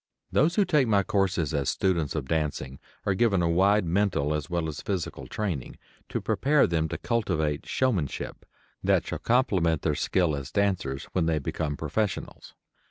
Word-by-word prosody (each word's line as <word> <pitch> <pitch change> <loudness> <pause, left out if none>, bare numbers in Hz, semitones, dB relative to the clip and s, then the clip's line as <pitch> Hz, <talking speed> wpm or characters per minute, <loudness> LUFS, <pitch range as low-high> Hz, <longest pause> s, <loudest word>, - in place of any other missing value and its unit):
Those 155 +6 +3
who 205 - +4
take 150 -8 +3
my 100 -3 +3
courses 95 -7 0
as 70 -3 0
students 85 -6 0
of 70 -4 -3
dancing 75 -4 -2 0.3
are 100 - +2
given 95 -3 +2
a - - +2
wide 95 +4 +3
mental 85 -5 +1
as 75 0 -3
well 85 -2 -1
as 75 -2 -5
physical 95 -5 -4
training, 90 - -3 0.3
to - - -2
prepare 145 +2 +3
them 80 -2 0
to - - -3
cultivate 85 -11 -1
showmanship 105 - -1 0.4
that - - +3
shall - - -4
complement 95 - +2
their 75 - +2
skill 80 +2 +1
as 70 -2 -6
dancers 95 -10 0
when 85 -3 +1
they 80 -1 +2
become 75 +1 -3
professionals. 95 +5 -3
85 Hz, 165 wpm, -27 LUFS, 75-100 Hz, 0.4 s, who